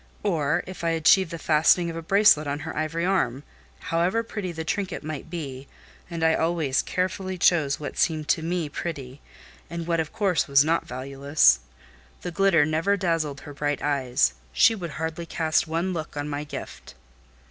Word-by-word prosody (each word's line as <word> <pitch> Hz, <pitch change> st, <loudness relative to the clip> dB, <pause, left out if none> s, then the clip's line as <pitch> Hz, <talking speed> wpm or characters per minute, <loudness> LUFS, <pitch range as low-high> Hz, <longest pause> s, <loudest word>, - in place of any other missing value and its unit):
Or, 155 Hz, -7 st, +1 dB
if 185 Hz, -2 st, -9 dB
I 165 Hz, -, +1 dB
achieved 165 Hz, +3 st, +4 dB
the 170 Hz, -, -5 dB
fastening 165 Hz, +2 st, +3 dB
of -, -, -8 dB
a 165 Hz, -, -4 dB
bracelet 195 Hz, -4 st, +4 dB
on 145 Hz, +1 st, -3 dB
her -, -, -6 dB
ivory 160 Hz, +2 st, -1 dB
arm, 145 Hz, -9 st, 0 dB, 0.5 s
however 180 Hz, +7 st, +2 dB
pretty 205 Hz, -5 st, -5 dB
the 160 Hz, -1 st, -5 dB
trinket 190 Hz, +1 st, -3 dB
might 155 Hz, 0 st, -6 dB
be 140 Hz, -6 st, -6 dB, 0.4 s
(and 165 Hz, -2 st, -4 dB
I 160 Hz, 0 st, +4 dB
always 160 Hz, -5 st, +1 dB
carefully 185 Hz, +1 st, -2 dB
chose 155 Hz, -5 st, +3 dB
what 145 Hz, -2 st, -6 dB
seemed 155 Hz, -2 st, +1 dB
to 160 Hz, -, +2 dB
me 170 Hz, 0 st, -2 dB
pretty, 145 Hz, -3 st, -6 dB, 0.5 s
and 170 Hz, 0 st, -5 dB
what 170 Hz, -1 st, 0 dB
of 160 Hz, -2 st, -2 dB
course 195 Hz, -5 st, +1 dB
was 140 Hz, 0 st, +5 dB
not 165 Hz, +1 st, 0 dB
valueless), 135 Hz, -, +2 dB, 0.6 s
the 180 Hz, -, -4 dB
glitter 175 Hz, -4 st, +3 dB
never 165 Hz, +6 st, +1 dB
dazzled 165 Hz, -7 st, -1 dB
her 145 Hz, -, -10 dB
bright 145 Hz, 0 st, -2 dB
eyes: 130 Hz, -, +1 dB, 0.2 s
she 225 Hz, -, +5 dB
would 180 Hz, -6 st, -5 dB
hardly 160 Hz, +1 st, -4 dB
cast 160 Hz, 0 st, 0 dB
one 170 Hz, +4 st, -1 dB
look 160 Hz, -3 st, -5 dB
on 145 Hz, 0 st, -3 dB
my 145 Hz, 0 st, -4 dB
gift." -, -, -9 dB
160 Hz, 180 wpm, -25 LUFS, 145-175 Hz, 0.6 s, was